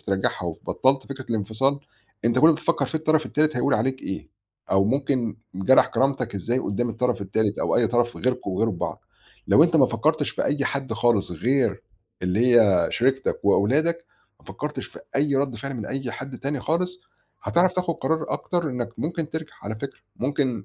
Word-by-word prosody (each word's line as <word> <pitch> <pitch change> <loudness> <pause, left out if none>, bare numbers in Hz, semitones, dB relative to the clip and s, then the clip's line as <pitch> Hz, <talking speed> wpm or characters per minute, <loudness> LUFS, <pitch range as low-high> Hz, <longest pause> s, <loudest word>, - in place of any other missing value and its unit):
ترجَّعها 95 -2 -1
وبطَّلت 130 +10 0
فكرة 135 -2 -7
الانفصال، 115 +6 0 0.4
أنت 115 - +3
كل - - +4
اللي 165 - +6
بتفكّر 170 +1 0
فيه 160 - -2
الطرف 155 0 +2
التالت 155 -1 +1
هيقول 135 +3 +2
عليك 130 +5 -1
إيه، 95 - -5 0.4
أو 95 0 +4
ممكن 130 -1 0 0.2
جَرَح 95 +8 +5
كرامتك 130 -4 0
إزاي 115 +6 -1
قُدّام 120 0 -1
الطَرَف 120 -1 -1
التالت 105 +2 0
أو - - +1
أي 120 - +4
طَرَف 120 0 0
غيركم 125 -4 -1
وغير 110 +5 +1
بعض. 90 - -5 0.4
لو 155 - +7
أنت 165 -1 +2
ما 135 -4 +6
فكّرتش 145 +6 0
في - - -2
أي 145 -1 0
حد 135 -3 -2
خالص 120 -4 +2
غير 125 - +1 0.4
اللي 110 +7 +3
هي 95 -6 +4
شريكتك 130 +2 +1
وأولادك، 155 +12 +2 0.3
ما - - -25
فكّرتش - - -5
في - - -13 0.2
أي 140 0 +2
رَد 135 -3 0
فِعل 135 +4 -5
من 110 -4 -5
أي 135 -2 -3
حد 130 +1 -7
تاني 140 0 -2
خالص، 180 +5 -1 0.4
هتعرف 180 +2 +3
تاخُد 180 -2 -1
قرار 160 0 -1
أكتر 175 -3 -1
إنّك 125 -2 -3
ممكن 165 -1 -3
ترجع 160 -1 -5
على 105 +2 -4
فكرة 135 +5 -7 0.2
ممكن 130 -5 -1
130 Hz, 180 wpm, -24 LUFS, 110-145 Hz, 0.4 s, لو